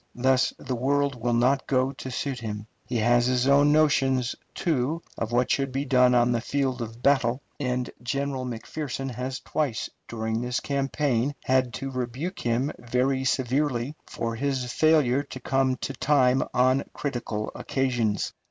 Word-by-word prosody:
Thus 130 +1 +3
the 130 - -4
world 140 +3 +1
will 120 0 +1
not 130 +3 +2
go 130 0 +2
to 130 - -8
suit 130 0 -3
him. 105 -2 -5 0.2
He 125 - -4
has 120 +2 +3
his 125 0 +2
own 140 +2 +5
notions, 135 -5 +3 0.2
too, 160 0 0
of 115 0 -3
what 120 +1 +2
should 135 -1 +1
be 135 +2 -2
done 125 -2 +4
on 120 0 +4
the 120 -1 +1
field 130 0 -1
of 115 +1 -7
battle, 130 -3 +3 0.2
and 125 -2 -1
General 135 +1 -2
McPherson 130 +2 -4
has 130 +2 -4
twice 145 -7 -2 0.2
during 110 0 -2
this 125 0 -1
campaign 140 -1 0
had 130 -1 +2
to 135 +5 -4
rebuke 130 +8 -4
him 125 +5 0
very 130 +3 0
severely 130 +1 0
for 115 0 -3
his 130 -1 -2
failure 150 -5 +4
to 140 -2 -9
come 130 +1 +1
to 135 - -5
time 135 -3 +3
on 130 +2 +3
critical 120 -6 -3
occasions. 120 -6 -1
130 Hz, 160 wpm, -26 LUFS, 120-140 Hz, 0.2 s, own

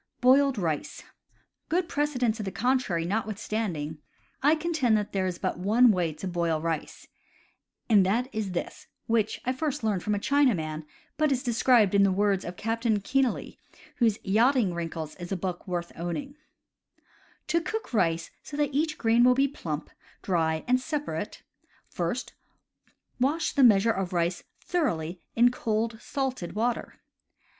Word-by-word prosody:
Boiled 265 0 +4
Rice. 160 -6 -3 0.3
— - - -42
Good 350 +1 +1
precedent 280 -7 0
to 220 - -6
the 200 - -3
contrary 245 -10 0
not 210 +5 -1
withstanding, 190 -8 -3 0.4
I 295 +4 +5
contend 310 -9 +1
that 210 -1 -3
there 190 -1 0
is 180 -2 -3
but - - -3
one 225 +6 +5
way 180 -5 0
to 155 +5 -7
boil 170 -3 0
rice, 165 -1 -4 0.8
and 210 -4 +6
that 225 +7 +1
is 210 -4 -3
this 175 - -5 0.2
(which 225 -2 0
I 255 - +1
first 275 -2 -3
learned 205 -4 0
from 210 +2 0
a - - -1
Chinaman, 195 - +1 0.3
but 305 -1 +2
is 260 -1 0
described 235 -4 +3
in 200 - +5
the 195 -1 +4
words 195 0 +1
of 175 - -6
Captain 225 0 0
Kenealy, 260 +5 -1 0.4
whose 225 -4 +3
Yachting 225 0 +3
Wrinkles 165 -2 -4
is 175 0 -8
a 195 - 0
book 180 +1 -4
worth 175 -1 -3
owning): 175 - -4 1.2
To 335 - +2
cook 435 - -5
rice 170 -5 +1
so 290 - -8
that 295 -1 0
each 310 +2 0
grain 230 +1 +3
will 250 0 +6
be 275 +2 +3
plump, 160 - -5 0.3
dry, 160 -4 0
and 255 +1 +3
separate, 295 +1 -4 0.4
first, - - -3 0.9
wash 305 +6 +1
the 280 - +4
measure 225 -1 +6
of 190 -3 -3
rice 175 0 -1 0.2
thoroughly 180 - -1
in 240 +1 +5
cold 225 -1 -2
salted 260 -10 -3
water. 235 +2 -2
220 Hz, 160 wpm, -27 LUFS, 180-260 Hz, 1.2 s, and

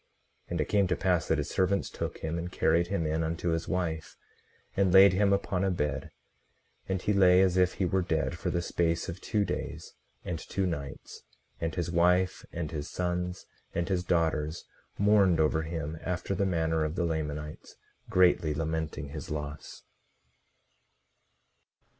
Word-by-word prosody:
18:43 - - -19
And - - 0
it - - +1
came 100 -2 +2
to 90 - +1
pass 90 -4 +1
that 80 - +2
his 75 -1 -2
servants 95 +1 +1
took - - -4
him 80 +1 -2
and 90 +1 -5
carried 85 0 +2
him 90 -3 -1
in 80 +1 0
unto 85 +2 -2
his 80 0 -1
wife, 85 -4 -3 0.6
and 95 -2 +3
laid 95 +1 +8
him 100 +1 +3
upon 100 -1 0
a 95 - +2
bed; 75 -5 -2 0.8
and 95 0 0
he 105 - +2
lay 90 -2 +6
as 90 -2 +2
if 90 -1 +3
he 95 - 0
were 95 +1 +1
dead 85 -1 -1
for 85 - -3
the 85 -1 -1
space 85 -1 0
of 85 +3 -6
two 105 -3 0
days - - -5 0.3
and 85 -3 -3
two 95 +2 -2
nights; 70 -6 -5 0.4
and 80 -1 -2
his 85 -1 -2
wife, 90 +2 +2
and 80 -2 -4
his 75 -2 -4
sons, 90 0 -2 0.3
and 85 +1 -1
his 90 -2 0
daughters 80 -2 0 0.3
mourned 100 -4 +4
over 80 0 +2
him, 80 -1 -4
after 90 +2 -2
the 95 +1 +1
manner 80 -3 +1
of 75 +1 -2
the 85 -1 0
Lamanites, 75 -2 -4 0.3
greatly 90 -4 +3
lamenting 80 -2 -3
his 75 +1 -7
loss. 75 0 -6
85 Hz, 170 wpm, -29 LUFS, 80-90 Hz, 0.8 s, laid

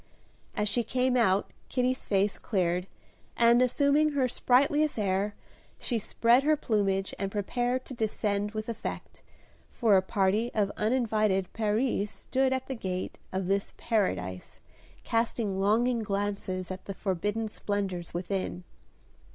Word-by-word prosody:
As 210 - 0
she 240 +4 +2
came 255 +1 +1
out 205 -5 +2 0.2
Kitty's 255 0 0
face 200 0 +1
cleared, 180 -3 0 0.5
and, 235 +1 +5
assuming 285 +4 +3
her 270 -3 +2
sprightliest 280 +5 +2
air, 200 0 0 0.4
she 235 -3 -2
spread 235 +4 +3
her 305 +2 +3
plumage 195 -6 0
and 195 0 -2
prepared 245 +5 -1
to - - -8
descend 210 -2 -1
with 215 0 -4
effect, 230 -1 -6 0.5
for 220 -5 +3
a 190 - +5
party 195 +4 +1
of 205 -2 +1
uninvited 215 -5 +1
peris 215 0 0
stood 265 +4 0
at 260 0 -1
the 270 - -3
gate 185 -6 -4
of 190 0 -2
this 195 +2 -1
Paradise 95 - -2 0.4
casting 225 -4 0
longing 230 +5 +2
glances 200 -3 -2
at 185 0 -7
the 195 - -5
forbidden 205 +4 -1
splendors 195 -5 -3
within. 180 0 -3
210 Hz, 135 wpm, -29 LUFS, 195-245 Hz, 0.5 s, and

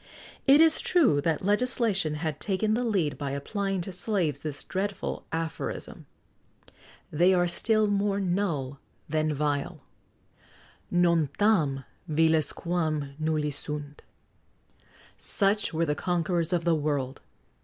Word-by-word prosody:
It 275 +2 +7
is 325 -1 +6
true 270 - +3
that 165 +3 -1
legislation 205 - +1
had 155 -1 -3
taken 210 +2 0
the 240 +3 0
lead 190 -12 0
by 140 -2 -3
applying 195 +6 -2
to 190 - -5
slaves 180 - -1
this 145 -2 -5
dreadful 195 +1 -4
aphorism: 165 0 -4 1.0
"They 175 +5 +4
are 175 0 +2
still 215 +5 +2
more 200 -1 +1
null 170 -8 -1 0.3
than 155 0 0
vile;" 145 +1 -2 1.1
Non 170 -4 +3
tam 160 -11 +2 0.3
viles 160 0 +3
quam 155 -5 -2
nulli 155 -2 0
sunt.[XX 140 - -4
102] 150 -1 -6 1.2
Such 205 +1 0
were 165 0 0
the 150 - 0
conquerors 170 +1 -1
of 175 -2 0
the 170 - +3
world! 145 -4 -2
170 Hz, 125 wpm, -27 LUFS, 150-195 Hz, 1.2 s, It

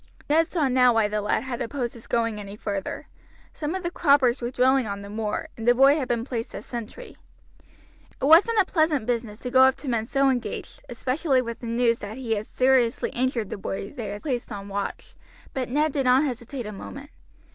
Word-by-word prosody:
Ned 320 +2 +3
saw 315 -6 +1
now 250 -2 +4
why 225 -2 +3
the 210 0 -2
lad 210 +2 0
had 260 -1 -4
opposed 240 0 -3
his 235 - -13
going 230 -2 0
any 200 0 -8
further. 200 -2 -4 0.5
Some 310 +3 -3
of 375 - -4
the 345 - -2
croppers 280 -7 +3
were 240 - -2
drilling 255 0 +2
on 200 0 -5
the 200 - -9
moor, 215 -1 -3
and 225 0 -6
the 245 - +6
boy 275 +3 +6
had 260 - -2
been 235 -1 -1
placed 240 -2 -4
as - - -7
sentry. 240 - -8 1.0
It - - -1
wasn't 345 +10 +6
a 390 - +5
pleasant 315 -9 +1
business 230 -3 -2
to 250 - -5
go 260 0 +6
up 265 0 +6
to 290 - -10
men 230 -3 -1
so 275 +1 +3
engaged, 245 -3 -4
especially 260 +4 0
with 235 -1 -6
the 235 - -7
news 230 0 +2
that 210 +3 -7
he 250 -4 -5
had 215 -1 -1
seriously 255 -2 +2
injured 245 -4 -1
the - - -5
boy 195 +1 -5
they 230 -4 -6
had 205 +1 -6
placed 250 -5 -3
on 200 -1 -7
watch. 200 0 -5 0.4
But 255 -2 -3
Ned 300 +3 +1
did 275 -3 0
not 255 +3 +5
hesitate 250 -2 -4
a 210 - -5
moment. 275 +8 -9
245 Hz, 220 wpm, -25 LUFS, 225-275 Hz, 1.0 s, the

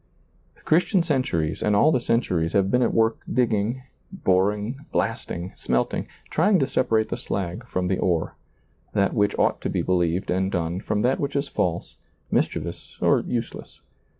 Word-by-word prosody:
The - - -24
Christian 180 +3 +2
centuries 130 - 0
and 105 - +2
all 150 +10 +5
the 130 - +2
centuries 90 -9 0
have 95 -1 +2
been 125 - +3
at - - +2
work 115 0 +2
digging, 120 0 +1 0.3
boring, 105 - 0
blasting, 95 -5 -2
smelting, 60 0 -1 0.2
trying 190 +5 +4
to 140 - +2
separate 115 -4 +1
the - - -2
slag 100 +5 -4
from 90 -5 -1
the 95 0 0
ore, 85 -3 0 0.6
that 100 -1 +2
which 100 -1 +1
ought - - +1
to - - -2
be - - -1
believed 90 0 0
and 95 +1 0
done 85 -1 -1
from 105 +1 -1
that 125 +2 +2
which 140 0 -2
is 140 0 0
false, 85 -8 -2 0.3
mischievous - - -2
or - - +4
useless. 120 -1 -5
105 Hz, 165 wpm, -24 LUFS, 90-125 Hz, 0.6 s, all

